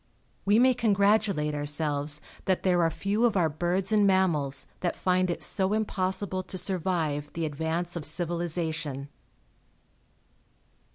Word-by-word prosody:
We 205 +2 +4
may 255 +2 +5
congratulate 200 -8 +2
ourselves 145 0 -1 0.2
that 185 -1 +1
there 180 -2 +3
are 165 - +3
few 200 +8 -1
of 230 -4 +3
our 165 -3 +3
birds 175 +6 -1
and 210 -2 +4
mammals 155 -8 +2
that 175 - -1
find 185 0 +1
it 175 - -2
so 190 0 +1
impossible 190 -2 -1
to 185 - -6
survive 165 -6 -2
the 165 -1 -2
advance 160 +4 -2
of 170 - -4
civilization. 160 -3 -2
175 Hz, 130 wpm, -27 LUFS, 155-190 Hz, 0.2 s, may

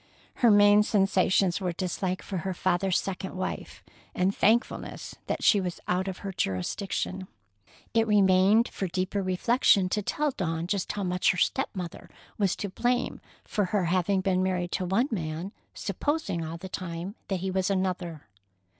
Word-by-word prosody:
Her 240 - +5
main 205 0 +7
sensations 195 -2 +2
were 180 -2 -1
dislike 185 +1 -2
for 195 - -4
her 185 +2 -3
father's 185 +1 +1
second 190 -1 -5
wife, 185 - -5 0.3
and 185 +2 +1
thankfulness 230 +4 0
that - - -2
she 205 - +5
was 180 -2 -4
out 185 +2 0
of 190 -1 -4
her 195 - -2
jurisdiction. 185 - -2 0.7
It 225 -1 +3
remained 200 +2 +5
for 195 - -4
deeper 185 +3 -1
reflection 190 +1 +3
to 210 - 0
tell 295 +8 0
Dawn 165 -7 -2
just 195 +1 -1
how 205 - -3
much 180 0 +1
her 180 - +2
step 270 +10 +1
mother 180 -3 -6 0.3
was 195 -3 +2
to 200 - -4
blame 245 +6 -1 0.2
for 205 - -1
her 185 0 0
having 185 +2 +1
been 185 -1 +1
married 180 -2 -1
to 185 - -1
one 195 +9 +2
man, 165 -1 -3 0.2
supposing 290 - -2
all 160 +1 -5
the 190 +3 -8
time 180 0 -5
that 190 -3 -2
he 190 0 -2
was 185 0 0
another. 185 -5 -2
190 Hz, 165 wpm, -27 LUFS, 180-200 Hz, 0.7 s, main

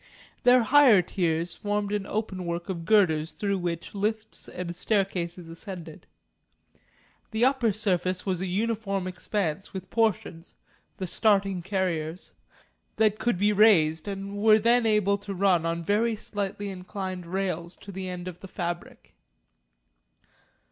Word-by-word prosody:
Their 250 0 +6
higher 250 -6 +6
tiers 170 -2 -1
formed 205 0 -2
an 205 -1 -2
openwork 185 -5 -3
of 170 -3 -4
girders 165 -7 +3
through 200 -2 -1
which 170 -2 -4
lifts 215 +2 -3
and 175 -1 -5
staircases 180 -3 -1
ascended. 165 -1 -9 1.2
The 225 +1 +2
upper 260 -4 +2
surface 185 -3 0
was 185 -3 -1
a 190 - -2
uniform 200 -1 -1
expanse, 185 -1 -3
with 185 -1 -7
portions 200 -7 -1 0.4
the 190 - -3
starting 195 -1 +2
carriers 175 -3 -2 0.6
that 215 -1 +2
could 240 -5 +1
be 205 +3 +3
raised 165 -7 +4
and 200 0 -5
were 215 0 +6
then 230 +2 +3
able 205 -2 +2
to 200 -1 -6
run 180 -3 +2
on 170 0 -2
very 220 +5 +1
slightly 205 -1 -4
inclined 185 -1 -6
rails 180 -2 -3
to 200 - -11
the 190 -1 -5
end 180 0 -6
of 180 -1 -7
the 195 - -10
fabric. 175 -2 -6
195 Hz, 135 wpm, -27 LUFS, 175-210 Hz, 1.2 s, Their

